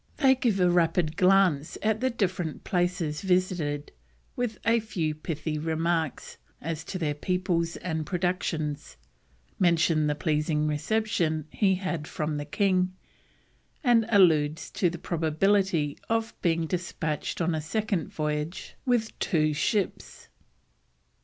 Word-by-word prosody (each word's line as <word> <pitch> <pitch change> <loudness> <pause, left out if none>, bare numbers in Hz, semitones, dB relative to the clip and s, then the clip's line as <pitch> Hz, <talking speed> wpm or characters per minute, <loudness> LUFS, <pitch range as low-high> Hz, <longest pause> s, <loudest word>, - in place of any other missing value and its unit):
They 265 -3 +5
give 235 -6 0
a 180 - +4
rapid 170 -2 +2
glance 185 -5 +3
at 220 0 +1
the 260 - +2
different 185 - -2
places 175 -4 -1
visited, 180 -6 0 0.4
with 240 -3 -2
a 230 +2 +4
few 170 -8 -2
pithy 155 0 -4
remarks 160 -1 -1 0.2
as 165 0 -4
to 185 - -4
their 155 -4 -1
peoples 170 +1 -1
and 160 -3 -3
productions; 160 - -2 0.6
mention 165 -3 +3
the 150 - 0
pleasing 150 0 0
reception 160 -1 0
he 195 -3 +2
had 175 -5 -3
from 150 -1 -2
the 145 - -4
king, 185 +2 +1 0.9
and 240 -4 +4
he 230 -1 -1
alludes 160 -5 +4
to 180 - +1
the 175 - -6
probability 165 -1 +1
of 225 0 0
being 165 -1 +1
despatched 165 -3 -3
on 170 -1 +1
a 155 - -1
second 205 +3 -2
voyage 150 +2 -3
with 235 -3 0
two 155 -3 +1
ships. 200 +6 -2
170 Hz, 130 wpm, -27 LUFS, 155-195 Hz, 0.9 s, They